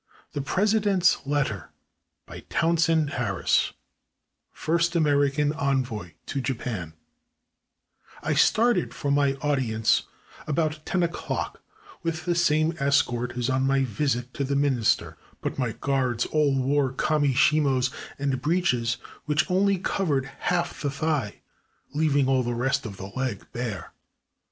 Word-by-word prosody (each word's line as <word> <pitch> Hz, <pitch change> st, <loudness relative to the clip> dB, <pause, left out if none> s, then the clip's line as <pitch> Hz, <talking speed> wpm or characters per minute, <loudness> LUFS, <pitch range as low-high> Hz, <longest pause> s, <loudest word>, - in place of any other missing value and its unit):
THE 145 Hz, -, -2 dB
PRESIDENT'S 195 Hz, -1 st, +2 dB
LETTER 135 Hz, -9 st, -1 dB, 0.6 s
BY -, -, -9 dB
TOWNSEND 165 Hz, -2 st, +2 dB
HARRIS, 105 Hz, -7 st, +1 dB, 0.8 s
FIRST 170 Hz, +2 st, 0 dB
AMERICAN 145 Hz, -2 st, +2 dB
ENVOY 130 Hz, -, -2 dB
TO 135 Hz, -, -3 dB
JAPAN 115 Hz, -10 st, -4 dB, 1.3 s
I -, -, 0 dB
STARTED 225 Hz, -6 st, +3 dB
for 140 Hz, -, -2 dB
my 140 Hz, -1 st, +3 dB
audience 120 Hz, -7 st, +1 dB, 0.4 s
about 155 Hz, 0 st, -1 dB
ten 185 Hz, -2 st, +1 dB
o'clock 170 Hz, 0 st, -3 dB, 0.4 s
with 165 Hz, -1 st, -3 dB
the 175 Hz, -, +2 dB
same 160 Hz, -1 st, +2 dB
escort 125 Hz, -4 st, +1 dB
as 120 Hz, -1 st, 0 dB
on 130 Hz, 0 st, +1 dB
my 135 Hz, 0 st, +3 dB
visit 125 Hz, 0 st, -1 dB
to 140 Hz, -, -2 dB
the 140 Hz, +1 st, -1 dB
Minister, 135 Hz, -5 st, +1 dB, 0.2 s
but -, -, -4 dB
my 125 Hz, -4 st, 0 dB
guards 130 Hz, -4 st, 0 dB
all 145 Hz, -3 st, +2 dB
wore 135 Hz, 0 st, +1 dB
kami 145 Hz, 0 st, +1 dB
shimos 135 Hz, -3 st, +3 dB, 0.3 s
and 140 Hz, -2 st, -1 dB
breeches 130 Hz, -9 st, +1 dB, 0.3 s
which 155 Hz, +3 st, +1 dB
only 195 Hz, +1 st, +3 dB
covered 155 Hz, -7 st, 0 dB
half 175 Hz, +5 st, -2 dB
the 145 Hz, -, 0 dB
thigh, 140 Hz, -6 st, -2 dB, 0.5 s
leaving 145 Hz, -3 st, +2 dB
all 135 Hz, -1 st, +3 dB
the 120 Hz, -1 st, -2 dB
rest 125 Hz, -1 st, 0 dB
of 100 Hz, -3 st, -9 dB
the 95 Hz, +1 st, -8 dB
leg 130 Hz, -6 st, -3 dB
bare. 120 Hz, -5 st, -5 dB
140 Hz, 130 wpm, -26 LUFS, 125-155 Hz, 1.3 s, STARTED